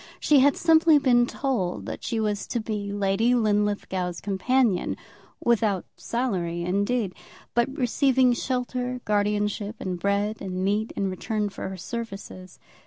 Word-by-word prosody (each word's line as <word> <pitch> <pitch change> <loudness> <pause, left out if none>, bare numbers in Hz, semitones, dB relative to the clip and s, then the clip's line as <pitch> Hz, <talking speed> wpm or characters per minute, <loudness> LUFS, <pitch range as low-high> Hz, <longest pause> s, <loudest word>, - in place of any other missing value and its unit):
She 295 -2 +5
had 280 +2 +4
simply 320 -1 +5
been 245 -4 +4
told 240 -12 -2
that - - -6
she 230 - -1
was 210 -2 -1
to 240 - -1
be 210 -2 -3
Lady 205 +4 +2
Linlithgow's 205 -5 0
companion, 210 +1 +1 0.4
without 215 -5 +1
salary, 180 -9 -2
indeed, 200 +3 0 0.4
but 240 +2 +2
receiving 260 -1 +3
shelter, 250 0 -2
guardianship, 210 0 0
and 180 -2 -4
bread 200 +3 0
and 185 -1 -3
meat 210 +3 0
in 195 -1 -1
return 210 +2 -2
for 195 - -6
her 190 - -7
services. 195 -2 -7
210 Hz, 135 wpm, -25 LUFS, 195-245 Hz, 0.4 s, She